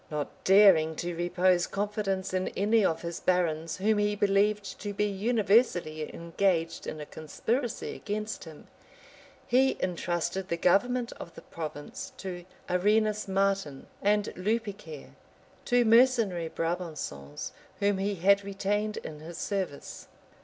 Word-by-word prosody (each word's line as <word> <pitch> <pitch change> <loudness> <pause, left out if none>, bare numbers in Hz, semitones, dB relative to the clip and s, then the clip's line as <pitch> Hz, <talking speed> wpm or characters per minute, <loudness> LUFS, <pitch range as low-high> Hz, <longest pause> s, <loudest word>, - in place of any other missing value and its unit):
Not 150 -2 -5
daring 185 -5 +6
to 175 +2 -3
repose 175 +1 +2
confidence 200 -2 -2
in 185 0 0
any 215 +2 +3
of 165 -3 0
his 170 0 -4
barons 165 -3 0
whom 210 +3 +2
he 205 0 +1
believed 205 0 +1
to 205 -1 -5
be 210 - +1
universally 200 -6 +1
engaged 170 -1 -1
in 155 - -5
a 150 - -6
conspiracy 225 - -3
against 215 -1 -4
him, 155 -2 -12 0.8
he 260 +2 +3
intrusted 175 +1 -2
the 170 - -1
government 240 +8 +2
of 170 - -9
the - - -11
province 155 -3 -7
to 180 -2 -6 0.2
Arenas 210 +3 +2
Martin 195 -7 0 0.2
and 205 0 +1
Lupicaire, 200 -6 -3 0.5
two 245 -1 +3
mercenary 225 -8 +4
Brabançons, 160 - -4 0.3
whom 200 -1 +2
he 200 +1 -1
had 200 +3 +4
retained 205 +2 -1
in 150 -1 -7
his 160 +2 -9
service. 190 -6 -4
195 Hz, 130 wpm, -29 LUFS, 170-210 Hz, 0.8 s, daring